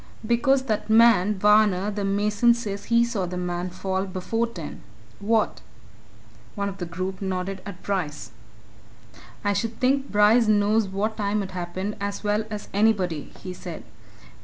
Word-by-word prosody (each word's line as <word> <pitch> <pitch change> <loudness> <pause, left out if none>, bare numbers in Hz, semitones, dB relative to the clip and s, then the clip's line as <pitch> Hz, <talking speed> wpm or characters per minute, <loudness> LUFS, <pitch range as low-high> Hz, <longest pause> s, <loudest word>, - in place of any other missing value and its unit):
"Because 260 +4 +2
that 220 -4 -2
man, 220 -3 +5
Varner, 210 -1 +4
the 205 0 -3
mason, 205 +4 +3
says 205 -4 -5
he 235 0 +3
saw 210 -6 -2
the 180 +1 -5
man 180 0 -3
fall 190 +1 -2
before 200 +5 -2
ten. 175 -10 -8 0.4
What?" 220 +1 +1 0.9
One 200 -1 -1
of 195 0 -9
the 175 - -4
group 185 +3 -5
nodded 190 0 -3
at 185 -3 -9
Bryce. 150 - -3 1.1
"I 205 - +2
should 225 +2 -3
think 270 +2 +1
Bryce 210 +3 +5
knows 210 0 +3
what 205 +3 -2
time 205 0 0
it 190 - -7
happened 185 +3 -4
as 200 +1 -3
well 210 +1 0
as 210 -1 -6
anybody," 195 -7 +1
he 185 - -5
said. - - -8
205 Hz, 155 wpm, -25 LUFS, 185-220 Hz, 1.1 s, man